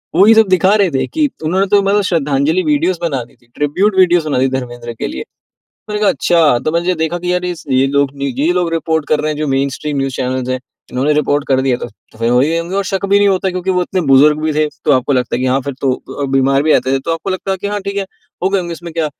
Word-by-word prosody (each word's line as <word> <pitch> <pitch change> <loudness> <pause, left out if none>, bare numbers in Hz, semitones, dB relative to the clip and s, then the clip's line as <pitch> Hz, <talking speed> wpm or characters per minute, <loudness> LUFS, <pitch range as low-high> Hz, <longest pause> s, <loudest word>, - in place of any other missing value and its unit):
वही 200 +6 +6
सब 220 -1 +5
दिखा 185 +2 +3
रहे 200 -5 +2
थे 135 -2 0
कि 305 -2 0
उन्होंने 185 +5 +1
तो 200 +1 +4
मतलब 200 +1 +2
श्रद्धांजलि 155 0 +1
वीडियोज़ 290 - +1
बना 140 -7 -1
दी 130 - -24
थी, 120 - -30
ट्रिब्यूट 185 +8 0
वीडियोस 175 -3 +4
बना 145 -4 0
दी 130 - +3
धर्मेंद्र 120 -2 -5
के - - -4
लिए। 65 - -5 0.7
मैंने 210 0 -3
कहा 205 - +4
अच्छा! 160 -5 +2
तो 155 - -2
मैंने 170 +2 0
देखा 160 +1 -1
कि 180 +1 -1
यार 180 0 -1
ये 180 - -2
स - - -13
लोग 135 +2 +2 0.3
ये 155 +5 +2
लोग 180 -2 0
रिपोर्ट 160 -2 -1
कर 155 - +1
रहे 155 0 -1
हैं, 150 - -5
जो 155 - -1
मेनस्ट्रीम 140 +2 -2
न्यूज़ 135 -1 -2
चैनल्स 130 0 -2
हैं। 130 - -1 0.3
उन्होंने 135 +4 +1
रिपोर्ट 145 -1 0
कर 130 -1 +2
दिया 130 -2 +1
था। - - -5 0.3
तो - - -18
फिर 115 +1 +1
वही 140 +7 +2
होंगे 170 +3 -4
और 200 - +1
शक 195 0 -2
भी 200 +1 +3
नहीं 205 - +4
होता, 190 -1 +1
क्योंकि 185 +1 -2
वो 180 -1 +1
इतने 185 +1 -1
बुजुर्ग 150 +3 +5
भी 155 0 -1
थे, 155 0 +1 0.2
तो - - +4
आपको 130 +1 +2
लगता 125 -2 0
है - - -2
कि - - 0
हाँ 130 +1 +2
फिर 140 +2 -5
तो 135 - +2 0.3
अ, - - +1
बीमार 135 +1 +2
भी 155 - +2
आते 130 - +1
थे, 135 - +1
तो 165 +5 -2
आपको 165 +4 -5
लगता 190 +1 -3
है 190 - -1
कि 200 - -4
हाँ 205 0 -2
ठीक 200 +1 -5
है, 195 - -1 0.4
हो 190 - +2
गए 195 - +1
होंगे 170 -2 -4
इसमें 170 0 -9
क्या 165 -2 0
160 Hz, 280 wpm, -15 LUFS, 135-185 Hz, 0.7 s, वही